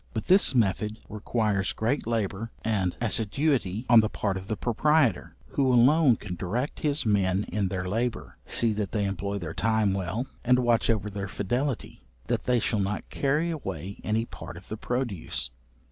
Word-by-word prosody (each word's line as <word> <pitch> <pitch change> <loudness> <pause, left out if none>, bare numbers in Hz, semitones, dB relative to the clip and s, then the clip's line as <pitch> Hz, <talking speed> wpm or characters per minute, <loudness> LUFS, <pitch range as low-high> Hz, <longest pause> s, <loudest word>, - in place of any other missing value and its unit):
But 110 - -2
this 185 -7 +4
method 105 -1 +1
requires 105 -2 0
great 115 +3 -1
labour 110 -1 -1
and 100 -5 0
assiduity 115 - 0
on 120 -2 +8
the 110 -1 +2
part 100 -3 -2
of 95 0 -6
the 110 - -2
proprietor, 125 - +2
who 135 -2 +2
alone 130 +2 +5
can 100 -3 -7
direct 115 - -3
his 150 -3 0
men 100 -2 +2
in 105 -2 0
their 90 -1 -3
labour, 115 +4 -2
see 115 -2 +2
that 105 -2 -3
they 105 -2 +1
employ 100 +1 -2
their 85 -4 -5
time 110 -1 +2
well, 95 +6 -2 0.2
and 125 +1 +4
watch 120 -2 +2
over 105 -2 +1
their 100 0 -4
fidelity, 120 +7 -2 0.2
that - - -1
they 125 -1 +3
shall 110 -1 0
not 100 +1 -2
carry 150 +5 +1
away 95 - -5
any 110 +1 0
part 85 - -9
of 90 - -13
the 110 - -4
produce. 100 - -3
110 Hz, 175 wpm, -27 LUFS, 100-125 Hz, 0.2 s, on